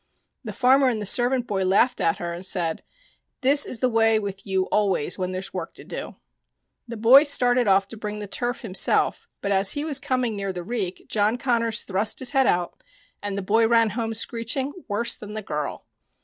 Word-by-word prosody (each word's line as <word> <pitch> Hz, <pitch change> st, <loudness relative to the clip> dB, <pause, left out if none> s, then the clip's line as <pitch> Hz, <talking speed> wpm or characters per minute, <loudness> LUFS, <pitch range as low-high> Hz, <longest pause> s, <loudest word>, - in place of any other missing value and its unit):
The 220 Hz, -, -5 dB
farmer 265 Hz, +5 st, +4 dB
and 230 Hz, -3 st, -2 dB
the 210 Hz, -, -4 dB
servant 245 Hz, +4 st, +2 dB
boy 195 Hz, -4 st, -1 dB
laughed 195 Hz, +7 st, +2 dB
at 165 Hz, -, +1 dB
her 170 Hz, -1 st, -4 dB
and 175 Hz, +2 st, -8 dB
said: 175 Hz, -4 st, -2 dB, 0.3 s
" -, -, -43 dB
This 280 Hz, +2 st, +4 dB
is 230 Hz, -, -4 dB
the 255 Hz, -, +3 dB
way 225 Hz, -1 st, +3 dB
with 200 Hz, -2 st, -5 dB
you 190 Hz, -1 st, +1 dB
always 195 Hz, -5 st, 0 dB
when 185 Hz, 0 st, -2 dB
there's 185 Hz, +1 st, -6 dB
work 175 Hz, -3 st, -6 dB
to -, -, -11 dB
do." -, -, -7 dB, 0.7 s
The 235 Hz, -1 st, -7 dB
boy 240 Hz, +6 st, +7 dB
started 250 Hz, -5 st, +3 dB
off 195 Hz, 0 st, +3 dB
to 225 Hz, -, -9 dB
bring 210 Hz, 0 st, -5 dB
the 210 Hz, -, -6 dB
turf 240 Hz, +5 st, -3 dB
himself, 200 Hz, -6 st, +1 dB
but 200 Hz, -, -2 dB
as 195 Hz, 0 st, +2 dB
he 290 Hz, +1 st, -3 dB
was 290 Hz, -4 st, 0 dB
coming 255 Hz, -5 st, -1 dB
near 195 Hz, -1 st, -3 dB
the 180 Hz, -1 st, -6 dB
reek 195 Hz, -3 st, -4 dB
John 215 Hz, +2 st, +1 dB
Connors 235 Hz, -3 st, 0 dB
thrust 200 Hz, +3 st, 0 dB
his 260 Hz, -, -3 dB
head 270 Hz, -2 st, +3 dB
out, 175 Hz, -, -1 dB, 0.4 s
and 205 Hz, -1 st, -4 dB
the 200 Hz, -, -3 dB
boy 225 Hz, +4 st, +3 dB
ran 230 Hz, -2 st, +3 dB
home 225 Hz, +1 st, -3 dB
screeching 235 Hz, +5 st, -2 dB
worse 235 Hz, +3 st, -1 dB
than 210 Hz, 0 st, -9 dB
the 215 Hz, -, -5 dB
girl. 150 Hz, -5 st, -4 dB
220 Hz, 210 wpm, -24 LUFS, 195-245 Hz, 0.7 s, boy